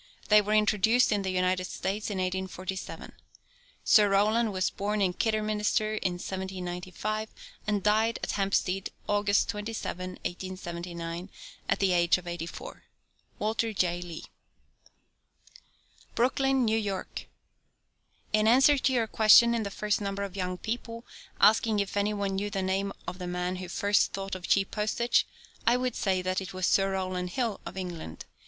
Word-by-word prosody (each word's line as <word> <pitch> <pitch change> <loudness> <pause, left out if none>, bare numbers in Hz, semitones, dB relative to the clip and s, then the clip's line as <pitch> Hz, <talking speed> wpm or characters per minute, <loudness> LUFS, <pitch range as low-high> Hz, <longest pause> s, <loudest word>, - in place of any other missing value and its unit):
They 210 0 +7
were 210 +1 0
introduced 215 +3 +3
in 205 -2 +1
the 190 - -2
United 185 0 +1
States 195 +4 -3
in 205 - -3
1847. 185 0 -4 0.7
Sir 210 -2 +6
Rowland 215 +3 +3
was 185 -1 0
born 210 +1 -2
at 185 -2 0
Kidderminster 215 0 +1
in 190 -4 -1
1795, 190 +3 -4 0.4
and 205 -2 0
died 220 +2 +2
at - - -1
Hampstead 195 -1 0 0.2
August 205 0 +2
27, 210 -4 -4
1879, 175 -1 -5 0.4
at - - +3
the 195 -2 +2
age 175 0 +4
of 180 - -11
eighty 170 -1 -4
four. - - -9 0.6
WALTER 220 +1 -1
J. 175 -3 0
LEE. 170 -2 -7 1.9
BROOKLYN, 265 +1 +2
NEW 220 0 +2
YORK. 200 -3 -4 1.1
In 215 0 +3
answer 270 +4 +6
to 265 - +2
your 235 -3 +2
question 220 +2 +6
in 230 - 0
the 200 - -3
first 210 +1 -1
number 200 0 -2
of 195 -1 -6
Young 180 -1 -2
People, 230 +2 -5 0.3
asking 215 +1 +4
if 200 -1 -2
any 205 +1 +1
one 200 -1 -1
knew 205 +1 -2
the 195 -2 -2
name 195 +1 0 0.2
of 180 - -5
the 180 - -5
man 180 +1 -2
who 180 -1 -7
first 200 +3 +2
thought 195 0 -4
of 185 -1 -5
cheap 195 -1 +2
postage, 220 +3 +1 0.4
I 240 +1 +5
would 250 -1 -2
say 185 -2 0
that 185 +1 -1
it 190 0 -7
was 185 -1 0
Sir 195 +1 +3
Rowland 185 -1 -2
Hill, 230 0 -2
of - - -8
England. 170 - -6
200 Hz, 160 wpm, -28 LUFS, 185-215 Hz, 1.9 s, They